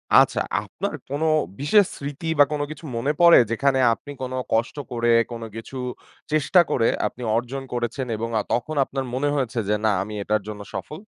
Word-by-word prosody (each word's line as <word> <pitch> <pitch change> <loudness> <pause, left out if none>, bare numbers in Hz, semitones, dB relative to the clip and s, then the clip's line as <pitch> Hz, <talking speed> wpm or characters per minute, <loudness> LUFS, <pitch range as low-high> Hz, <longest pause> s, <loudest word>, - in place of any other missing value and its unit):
আচ্ছা - - +5 0.2
আপনার 160 - -4
কোনো 145 +4 -1 0.3
বিশেষ 190 +9 +5
স্মৃতি 145 +3 -6
বা - - +10
কোন 150 -1 -1
কিছু 155 +1 -9
মনে 130 +5 +1
পড়ে 170 0 +9
যেখানে 130 +3 +2
আপনি 145 - -9
কোন 130 0 -4 0.2
কষ্ট 115 +2 +1 0.2
করে 120 -1 0 0.2
কোন 115 -1 -6
কিছু 115 +4 -7 0.5
চেষ্টা 155 +4 +4
করে 115 -2 +2 0.2
আপনি 125 - -10 0.2
অর্জন 125 +3 -3
করেছেন? 120 +2 -2
এবং 115 +1 -3
আ - - +1
তখন 125 +6 -1
আপনার 135 -1 -3
মনে 140 +3 0
হয়েছে 125 -3 -1
যে 105 - +3
না 110 - +4
আমি 105 - -8
এটার 105 +1 0
জন্য 105 -1 -6
সফল? 155 - -6
130 Hz, 185 wpm, -23 LUFS, 115-145 Hz, 0.5 s, বা